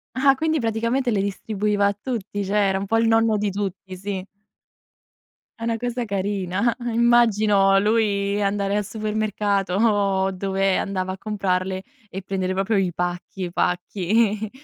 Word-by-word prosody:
Ah 275 +1 +5
quindi 315 +2 0
praticamente 230 +3 0
le 200 -3 +1
distribuiva 205 0 0
a 200 - +1
tutti, 205 -4 -4
cioè 195 +2 -3
era 190 - +1
un 195 - -3
po' 225 +3 +1
il 230 - +3
nonno 225 -1 +3
di 205 -1 0
tutti, 190 -1 -5
sì. 195 0 -4 1.4
È 230 - -6
una 230 -1 0
cosa 245 +1 -3
carina, 200 +2 -1 0.2
immagino 215 -4 +4
lui 205 -1 +1
andare 200 0 0
al 210 - 0
supermercato 210 -3 -1
o 200 -3 +2
dove 195 0 0
andava 185 -1 -2
a 190 - -8
comprarle 190 -3 -1 0.3
e 195 0 -6
prendere 185 -1 -2
proprio 195 +3 0
i 185 -3 +1
pacchi 180 +2 -4
i 175 - -5
pacchi, 205 +5 0
200 Hz, 150 wpm, -23 LUFS, 190-220 Hz, 1.4 s, Ah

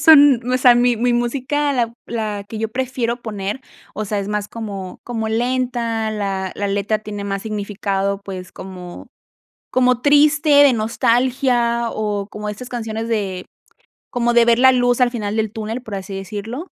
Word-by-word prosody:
son, 290 -5 +7
o 255 - +3
sea, 250 -1 +6
mi 245 0 +3
mi 245 +2 +1
música, 275 +4 0
la 235 -3 0
la 215 -3 -3
que 220 - -7
yo 220 0 -1
prefiero 250 -1 -2
poner, 210 +2 -4 0.3
o 215 - -3
sea, 205 0 -1
es 200 - -3
más 210 -1 -2
como 200 -5 -6
como 225 -2 -3
lenta, 235 -1 -1
la 195 -3 -2
la 205 0 -2
letra 205 +2 0
tiene 205 -1 -6
más 195 -1 -3
significado, 200 -2 -2
pues, 185 -2 -7
como 180 -2 -9 0.6
como 250 -1 +3
triste, 295 +2 +4
de 285 -2 +7
nostalgia, 235 +1 +1
o 205 -2 -2
como 210 0 -5
estas 245 +5 -7
canciones 225 -2 -4
de, 195 -5 -2 0.7
como 240 -1 +1
de 235 0 +6
ver 235 0 +4
la 260 +1 +7
luz 245 0 +2
al 250 -1 +4
final 215 -3 -3
del 220 -2 -1
túnel 225 +2 -4
por 220 -4 -7
así 195 0 -6
decirlo. 210 - -6
225 Hz, 170 wpm, -20 LUFS, 205-245 Hz, 0.7 s, son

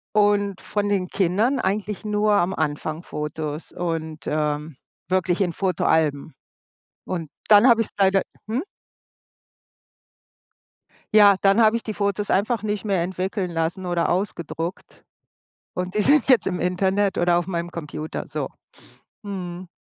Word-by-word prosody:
Und 205 -2 +2
von 205 -1 -2
den 190 -3 0
Kindern 205 +9 +1
eigentlich 205 +1 -2
nur 210 0 +2
am 190 -2 +2
Anfang 155 0 -2
Fotos 150 -1 -5
und, 160 -4 -4
ähm, 150 -1 -2 0.3
wirklich 185 +1 +1
in 175 -3 +1
Fotoalben. 160 -6 0 0.7
Und 170 -5 -4 0.2
dann 210 +4 +7
habe 230 -2 +5
ich - - -6
es - - -23
leider 195 -1 +4 0.3
hm? 245 +7 -1 2.5
Ja, 205 -2 +8
dann 195 +3 +4
habe 220 0 +5
ich 230 - -2
die 215 - -4
Fotos 200 0 -1
einfach 215 +2 +1
nicht 210 0 -2
mehr 195 -4 +1
entwickeln 185 +1 -3
lassen 165 +3 -2
oder 175 -1 0
ausgedruckt. 175 -2 -4 0.7
Und 180 +1 -3
die 210 - +1
sind 290 +6 +4
jetzt 255 -3 +4
im 180 -2 -2
Internet 190 +2 +1
oder 175 0 +3
auf 175 - -1
meinem 175 -2 -3
Computer, 155 -2 -6
so. - - -3 0.7
Mhm. 185 -3 -6
185 Hz, 140 wpm, -23 LUFS, 170-205 Hz, 2.5 s, Ja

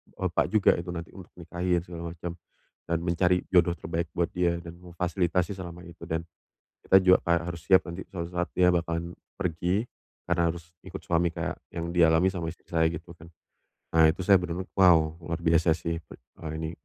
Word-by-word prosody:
bapak 90 -2 0
juga 110 -2 +4
itu 85 - -7
nanti 85 -1 -7
untuk 95 -3 -12
nikahin 85 0 -1
segala 85 -1 -7
macam, 85 0 -5 0.6
dan 85 - +1
mencari 90 +1 +2
jodoh 90 -1 +4
terbaik 85 0 -3
buat 85 -1 0
dia 85 -1 +1
dan 85 +1 -10
memfasilitasi 90 0 -1
selama 90 -1 -8
itu 85 -2 -13
dan 80 0 -2 0.6
kita 95 - +6
juga 95 0 +6
kayak 85 0 +2
harus 85 -2 -5
siap 95 +2 +5
nanti 85 +2 -6
suatu 85 -3 -4
saat 90 0 -1
dia 90 -1 +4
bakalan 85 0 -2 0.2
pergi 90 +4 -1 0.4
karena 85 -1 +2
harus 85 0 -11
ikut 95 0 -7
suami 85 0 +1
kayak - - -3 0.2
yang 85 0 -4
dialami 85 +1 +5
sama 85 -3 -2
istri - - -18
saya 80 -1 +2
gitu 85 +2 -8
kan. 85 0 -14 0.7
Nah, 80 -1 +7
itu 90 - -7
saya 100 - +8
bener-bener, 90 +1 -4
wow, 80 -5 +5
luar 85 0 -3
biasa 85 0 +3
sih 85 +1 -1
per - - -14 0.3
eee, 80 - -3
ini 80 0 -3
85 Hz, 190 wpm, -27 LUFS, 85-90 Hz, 0.7 s, saya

